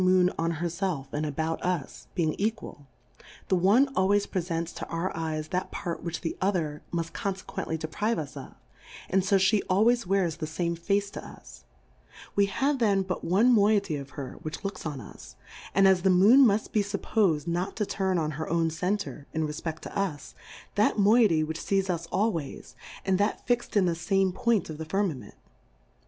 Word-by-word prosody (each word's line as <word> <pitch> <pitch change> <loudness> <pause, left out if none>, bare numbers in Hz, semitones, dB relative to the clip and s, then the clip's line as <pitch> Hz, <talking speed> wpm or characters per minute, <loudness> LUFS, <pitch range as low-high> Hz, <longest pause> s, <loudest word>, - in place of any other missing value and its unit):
89 185 0 +4
Moon 180 0 +4
on 165 +1 +1
herfelf 170 -4 -3
and 150 +1 -1
about 160 +3 -2
us, 180 -6 -3
being 160 -4 +1
equal; 200 -9 -3 0.6
the 190 - +4
one 200 +10 +4
always 200 +2 +3
prefents 170 -2 -3
to - - -6
our 170 +3 -3
Eyes 155 -1 -3
that 180 +1 -2
Part 170 -4 -4
which 170 -1 -4
the 165 - -3
other 170 -6 0
muft 165 -1 -2
confequently 190 -4 -4
deprive 185 +9 -1
us 150 -3 -5
of, - - -9 0.6
and 190 0 +3
fo 195 - +2
fhe 195 +2 +4
always 225 +3 +3
wears 180 -4 +1
the 155 -2 -4
fame 170 +2 -2
Face 200 +4 0
to - - -7
us: - - -13 0.7
We 200 0 +4
have 275 +7 0
then 200 -4 +3
but 185 -1 -4
one 215 +8 +4
Moiety 205 -5 +3
of 140 0 -8
her 140 -3 -6
which 155 0 -6
looks 195 -4 -4
on 145 -3 -5
us, 105 - -12 0.4
and 195 0 +6
as 190 -2 +4
the 190 - +3
Moon 210 +9 +7
muft 210 0 0
be 215 - +2
fup 200 0 -4
pos'd 170 -10 +1
not 175 +3 -2
to 210 - -1
turn 190 -2 0
on 155 -2 0
her 155 - -4
own 165 0 +1
Center, 180 -3 -3
in 160 -1 0
refpeft 160 +1 -5
to - - -9
us, 190 -8 -3 0.4
that 210 +1 +2
Moiety 205 -6 +5
w^hich 160 +1 -4
fees 195 -1 0
us 170 -1 -4
always, 180 -7 -2 0.3
and 190 -1 +2
that 205 - 0
fixM 240 -2 -1
in 195 - +4
the 175 - +2
fame 190 +3 +1
Point 230 0 +1
of 155 -1 -7
the 160 - -4
Firmament. 160 - -2
185 Hz, 190 wpm, -27 LUFS, 160-200 Hz, 0.7 s, Moon